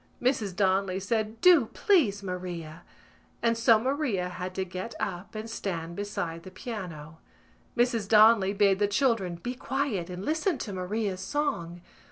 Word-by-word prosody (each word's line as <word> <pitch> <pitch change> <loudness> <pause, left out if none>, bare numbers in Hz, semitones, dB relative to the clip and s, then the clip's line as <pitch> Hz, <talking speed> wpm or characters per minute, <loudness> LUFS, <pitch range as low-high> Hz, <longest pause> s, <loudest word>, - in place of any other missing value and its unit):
Mrs 225 -7 0
Donnelly 190 -1 +1
said 220 +2 -2
"Do, 340 -10 +6
please, 250 - +3
Maria!" 175 -4 -6 0.6
and 230 0 +3
so 230 0 +5
Maria 245 -7 -1
had 180 +1 -6
to 190 - -1
get 185 +5 -6
up 190 +2 -4
and 215 +1 -5
stand 170 -6 -4
beside 175 -5 -4
the 185 - -10
piano. 175 -7 -7 0.6
Mrs 235 -4 +2
Donnelly 215 -2 +6
bade 200 -1 +3
the 205 - +3
children 205 -5 +1
be 245 +9 -5
quiet 250 -8 -2
and 180 +2 -6
listen 320 +2 0
to 210 -4 -5
Maria's 190 +1 -2
song. 190 - -2
200 Hz, 150 wpm, -28 LUFS, 180-230 Hz, 0.6 s, Do